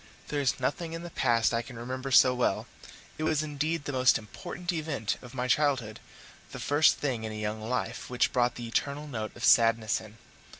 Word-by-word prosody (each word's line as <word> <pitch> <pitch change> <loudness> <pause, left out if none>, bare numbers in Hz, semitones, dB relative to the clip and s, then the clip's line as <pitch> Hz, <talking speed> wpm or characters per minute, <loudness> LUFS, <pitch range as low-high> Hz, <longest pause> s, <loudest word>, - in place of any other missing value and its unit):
There 145 -1 -1
is 135 - 0
nothing 160 +6 -2
in 165 +1 -5
the 175 - -8
past 115 -4 +2
I 115 - +1
can 120 0 -11
remember 130 +3 -5
so 130 -1 +6
well: 125 -5 0 0.5
it - - -2
was 155 -1 +1
indeed 155 +1 -2
the - - -2
most 130 -1 +4
important 175 - -6
event 150 -10 -2
of 125 0 -12
my 125 0 -1
childhood 130 -4 +1 0.5
the - - -6
first 145 +2 +4
thing 125 -6 -2
in 110 - -4
a - - -6
young 105 0 -3
life 115 +4 -3
which 125 -1 +1
brought 120 -2 +2
the 120 0 -6
eternal 140 +5 -2
note 110 -7 -5
of 120 - -9
sadness 115 -2 +4
in. 110 0 -13
125 Hz, 205 wpm, -29 LUFS, 115-145 Hz, 0.5 s, so